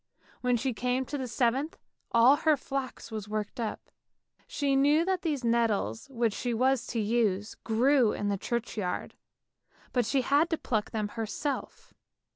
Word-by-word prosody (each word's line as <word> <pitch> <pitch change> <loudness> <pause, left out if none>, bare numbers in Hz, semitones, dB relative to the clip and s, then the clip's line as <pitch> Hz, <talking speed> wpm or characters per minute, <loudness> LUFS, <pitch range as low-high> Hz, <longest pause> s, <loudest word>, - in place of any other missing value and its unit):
When 250 -1 +2
she 255 +2 -1
came 250 +3 -1
to 290 - -4
the 260 - -3
seventh, 255 +6 0 0.3
all 240 +5 +6
her 310 -1 +3
flax 270 -3 -5
was 215 -2 -5
worked 215 +1 -3
up; 225 -2 -4 0.6
she 280 -2 0
knew 295 +4 +4
that 375 -1 0
these 295 -6 -1
nettles 230 - 0
which 235 -4 0
she 240 +1 -2
was 255 +1 +2
to 235 - -2
use 210 -2 +1
grew 240 +1 +3
in 205 - -2
the 200 - +1
churchyard, 220 -6 -3 0.8
but 245 -4 +1
she 275 - +2
had 285 +6 +3
to 325 - 0
pluck 215 -7 -1
them 215 -2 -2
herself. 230 +6 -4
240 Hz, 160 wpm, -29 LUFS, 220-275 Hz, 0.8 s, all